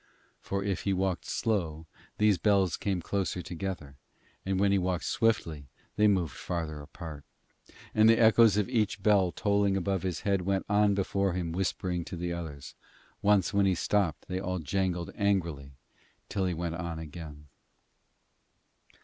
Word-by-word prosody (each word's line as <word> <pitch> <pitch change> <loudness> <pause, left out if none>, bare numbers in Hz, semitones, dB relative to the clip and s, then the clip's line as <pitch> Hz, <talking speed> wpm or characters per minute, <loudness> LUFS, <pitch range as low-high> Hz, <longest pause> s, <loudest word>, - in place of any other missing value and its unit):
For 100 0 -3
if 100 -2 -1
he 100 - 0
walked 95 -2 -1
slow, 80 -8 -1 0.3
these 105 -3 +3
bells 100 -4 +3
came 95 -4 -2
closer 95 -2 -2
together, 85 -6 -5 0.5
and 95 0 -1
when 100 0 +3
he 100 - +3
walked 90 -1 -1
swiftly 80 - 0 0.3
they 105 - +4
moved 90 -10 +1
farther 75 0 -4
apart. 75 0 -9 0.7
And 110 +1 +6
the 115 - +6
echoes 110 -2 +6
of 105 - +1
each 110 -5 0
bell 100 -4 +4
tolling 100 -1 +1
above 95 0 -1
his 90 -2 -3
head 100 -2 +1
went 95 +1 -1
on 105 0 +3
before 100 -1 0
him 85 -2 -2
whispering 90 0 -1
to - - -6
the 85 0 -3
others. 80 -5 -7 0.5
Once 100 -2 +3
when 100 -1 +3
he 95 - +2
stopped 90 -4 0
they 95 0 -2
all 90 -1 -2
jangled 90 +1 -1
angrily 85 -9 -1 0.6
till 95 -2 -1
he 90 - 0
went 85 0 -3
on 85 -2 -4
again. 80 -2 -9
95 Hz, 160 wpm, -29 LUFS, 85-100 Hz, 0.7 s, And